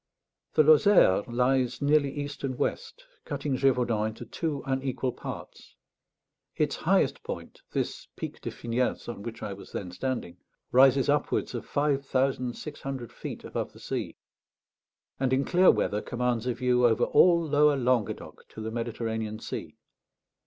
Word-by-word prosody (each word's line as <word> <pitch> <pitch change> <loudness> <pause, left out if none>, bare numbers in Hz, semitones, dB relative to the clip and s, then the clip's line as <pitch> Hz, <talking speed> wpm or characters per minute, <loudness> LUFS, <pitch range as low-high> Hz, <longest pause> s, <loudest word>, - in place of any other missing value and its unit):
The 155 - +6
Lozère 155 - +6
lies 125 +1 +1
nearly 145 0 +3
east 145 0 -6
and 130 -2 -2
west, 470 - -3 0.2
cutting 140 -3 -2
Gévaudan 125 -5 +2
into 110 +1 -7
two 155 -5 -3
unequal 130 -1 -1
parts; - - -9 0.8
its - - 0
highest - - +2
point, - - -7
this - - -3
Pic - - -6
de - - -4
Finiels, 120 +2 -2
on 120 -4 -6
which 115 +2 -7
I 100 - -3
was 100 - -12
then 90 -2 -4
standing, 125 -3 -3 0.3
rises 135 +1 +5
upwards 145 0 +1
of - - -5
five 145 -1 +1
thousand 130 -2 0
six 150 -1 -8
hundred 130 -4 -5
feet - - -7
above - - -4
the - - -15
sea, - - -4 1.0
and 130 -1 +1
in 135 +1 +2
clear 185 +1 +5
weather 105 +1 +2
commands 125 -1 -1
a 125 - 0
view 125 -1 +3
over 110 -2 +2
all 175 -1 +5
lower 150 -2 +3
Languedoc 125 -4 -1
to 110 - -10
the 110 +1 -4
Mediterranean 110 -2 -3
Sea. - - -7
130 Hz, 150 wpm, -28 LUFS, 120-145 Hz, 1.0 s, The